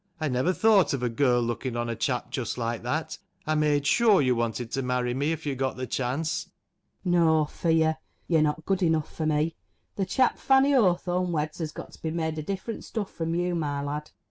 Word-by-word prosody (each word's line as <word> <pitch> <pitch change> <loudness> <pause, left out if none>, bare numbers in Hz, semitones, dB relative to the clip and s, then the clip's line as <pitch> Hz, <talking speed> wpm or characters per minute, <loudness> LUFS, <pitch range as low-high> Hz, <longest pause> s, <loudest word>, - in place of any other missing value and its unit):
I 155 -2 -1
never 130 +8 +1
thought 205 -3 +4
of 130 -3 -2
a 125 - +1
girl 120 0 +2
looking 120 +1 -3
on 120 0 -1
a 115 - -2
chap 125 +1 -2
just 125 -3 -3
like 115 -1 -2
that! 150 +7 -3 0.3
I 155 - +1
made 150 -2 +2
sure 220 +5 +5
you 130 -3 +3
wanted 115 0 -2
to 135 - -1
marry 125 -1 0
me 140 +5 0
if 160 - -4
you 145 - -1
got 130 0 -2
the 130 - -4
chance. 135 +7 -2 0.5
104 175 -3 +3
KINDLE 160 -1 +4
WAKES 150 - -3
[ACT - - -19
FANNY. 165 -1 +3
No 160 - +4
fear! 160 0 0 0.3
You're 165 -3 +3
not 155 +1 0
good 195 -1 0
enough 160 -3 +1
for 155 - -1
me. 155 +1 +1 0.4
The 195 -2 0
chap 255 +6 +2
Fanny 270 +1 +4
Hawthorn 180 -5 +2
weds 155 -1 -2
has 160 -2 -3
got - - -9
to - - -16
be 160 - -2
made 160 -1 -2
of 150 - -7
different 200 +4 -4
stuff 210 -4 -4
from 165 0 -2
you, 175 +1 0
my 145 -4 -2
lad. 150 +1 -4
155 Hz, 235 wpm, -27 LUFS, 130-170 Hz, 0.5 s, sure